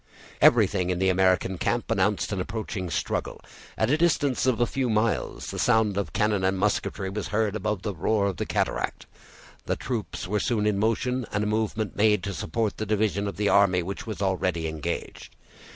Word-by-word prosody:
Everything 90 -1 +4
in 90 - 0
the 95 +1 +2
American 95 -1 +2
camp 120 -1 -1
announced 105 -1 +1
an 100 -2 -1
approaching 100 -2 -4
struggle. - - -2 0.4
At 110 +3 +1
a 150 - +4
distance 145 -7 +2
of 125 -2 +2
a 120 - +4
few 130 +1 -1
miles, 110 +1 -1
the - - -5
sound 110 -4 +3
of 100 0 -2
cannon 105 -2 +1
and 95 +1 +1
musketry 100 -1 -1
was 105 +1 -4
heard 105 0 0
above 105 -2 -2
the 105 - -2
roar 100 +4 +1
of 95 -4 -1
the - - -3
cataract. - - -1 0.6
The - - +1
troops 110 -10 -4
were 105 +3 0
soon 105 0 0
in 105 -2 +1
motion, 120 +3 0
and 105 0 0
a - - -1
movement 110 0 -1
made 105 -2 +3
to 100 - -3
support 110 +2 -2
the 110 - -3
division 105 -1 0
of 100 -4 -5
the 105 -1 +1
army 95 -3 +4
which 100 +6 -6
was 105 -2 -4
already 90 -3 0
engaged. 80 -2 -5
105 Hz, 195 wpm, -26 LUFS, 95-110 Hz, 0.6 s, Everything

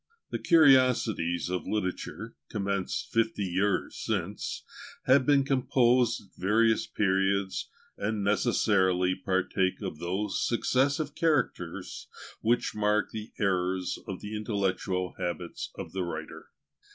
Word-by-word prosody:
The - - -2
"Curiosities 130 - +4
of 90 0 -3
Literature," 100 -4 -3
commenced 100 -2 -2
fifty 115 -2 +1
years 95 +1 0
since, - - -3 0.4
have 130 +1 +4
been 140 -2 +5
composed 125 -3 +2
at 100 - -21
various 110 +3 +3
periods, 95 -1 0 0.3
and 105 0 -1
necessarily 95 -4 +2
partake 95 0 0
of 90 -6 -5
those 95 +3 -2
successive 140 +5 +1
characters 155 -7 -1 0.3
which 120 +2 +1
mark 105 -1 +1
the 110 0 -7
eras 95 -2 0
of 95 - -5
the 105 +1 -6
intellectual 95 -3 -1
habits 85 0 -4
of - - -6
the 95 - -3
writer. 85 -1 -6
100 Hz, 115 wpm, -29 LUFS, 95-120 Hz, 0.4 s, been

